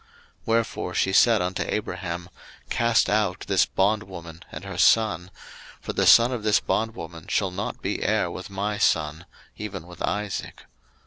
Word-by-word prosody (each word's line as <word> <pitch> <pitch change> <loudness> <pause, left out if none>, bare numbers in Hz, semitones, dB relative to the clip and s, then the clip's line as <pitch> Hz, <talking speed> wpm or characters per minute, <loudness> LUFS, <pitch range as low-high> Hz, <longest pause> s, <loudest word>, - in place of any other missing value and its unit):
01:021:010 455 - -30 0.4
Wherefore 115 0 0
she 95 - +1
said 115 +1 +5
unto 90 +1 -2
Abraham, 90 -4 -4 0.4
Cast 115 -1 +3
out 105 -3 +1
this 95 -2 +2
bondwoman 95 -5 -2
and - - -7
her - - -6
son: 105 -6 +3 0.5
for - - -5
the - - +1
son 115 +2 +7
of 125 -3 -3
this 105 -1 +3
bondwoman 85 -8 -3
shall 95 -3 0
not 95 +2 -5
be - - -2
heir - - +1
with - - -7
my 100 +1 -3
son, 80 +2 +1 0.3
even 100 -5 -6
with 90 -1 -13
Isaac. 105 -1 -3
100 Hz, 155 wpm, -25 LUFS, 90-110 Hz, 0.5 s, son